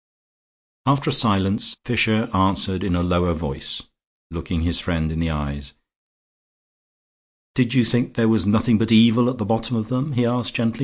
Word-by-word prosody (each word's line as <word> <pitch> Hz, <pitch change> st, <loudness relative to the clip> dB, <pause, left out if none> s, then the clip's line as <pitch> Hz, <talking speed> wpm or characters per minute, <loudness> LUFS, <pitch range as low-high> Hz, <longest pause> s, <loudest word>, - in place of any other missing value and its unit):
After 140 Hz, 0 st, +2 dB
a -, -, +2 dB
silence 100 Hz, -3 st, +1 dB
Fisher 115 Hz, -2 st, +1 dB
answered 95 Hz, 0 st, 0 dB
in 95 Hz, -4 st, -1 dB
a 85 Hz, -, 0 dB
lower 90 Hz, 0 st, +1 dB
voice, 75 Hz, -4 st, -4 dB, 0.5 s
looking 85 Hz, 0 st, -4 dB
his 85 Hz, 0 st, +1 dB
friend 80 Hz, -3 st, -2 dB
in 80 Hz, -, -4 dB
the 85 Hz, 0 st, -1 dB
eyes. 70 Hz, -2 st, -5 dB, 1.8 s
"Did 125 Hz, 0 st, 0 dB
you 125 Hz, -3 st, +4 dB
think 120 Hz, +2 st, -1 dB
there 115 Hz, -1 st, +2 dB
was 110 Hz, -2 st, +2 dB
nothing 110 Hz, +1 st, +2 dB
but 115 Hz, 0 st, 0 dB
evil 115 Hz, +2 st, +5 dB
at 125 Hz, -, -4 dB
the 105 Hz, -, -3 dB
bottom 115 Hz, +3 st, -1 dB
of 110 Hz, -1 st, -3 dB
them?" 130 Hz, +4 st, -2 dB
he 125 Hz, -1 st, +1 dB
asked, 120 Hz, -1 st, -1 dB
gently. 115 Hz, 0 st, -1 dB
110 Hz, 170 wpm, -21 LUFS, 85-120 Hz, 1.8 s, evil